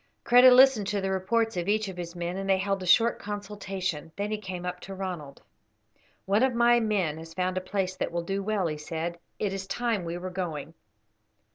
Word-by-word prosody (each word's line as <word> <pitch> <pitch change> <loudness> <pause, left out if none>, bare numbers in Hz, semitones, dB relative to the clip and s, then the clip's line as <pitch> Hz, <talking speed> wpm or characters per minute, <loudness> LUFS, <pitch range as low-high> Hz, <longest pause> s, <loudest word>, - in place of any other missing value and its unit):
Kreta 245 +1 +8
listened 250 -5 +6
to 205 0 0
the 195 0 -1
reports 225 +4 0
of 175 +1 -2
each 215 +1 +1
of 190 - -6
his 175 -1 -6
men, 175 +1 -3
and 195 0 -4
they 190 - +4
held 195 0 -1
a 185 - -5
short 230 +6 +4
consultation. 195 -6 -4
Then 205 +1 -3
he 215 - -2
came 185 -3 -6
up 180 0 -4
to 195 +1 -8
Ronald. 175 -7 -6 0.8
"One 200 +3 +2
of 260 -2 +2
my 240 0 +5
men 195 -9 0
has 165 0 -11
found 185 0 -1
a 185 - -1
place 185 0 -2
that - - -2
will 170 0 -2
do 195 +3 -2
well," 205 -2 0
he 155 -2 -2
said. 165 +3 -4 0.2
"It 200 -2 -1
is 190 0 -5
time 230 -2 -1
we 170 +1 -4
were 185 +1 -6
going." 165 -4 -4
190 Hz, 220 wpm, -27 LUFS, 175-210 Hz, 0.8 s, Kreta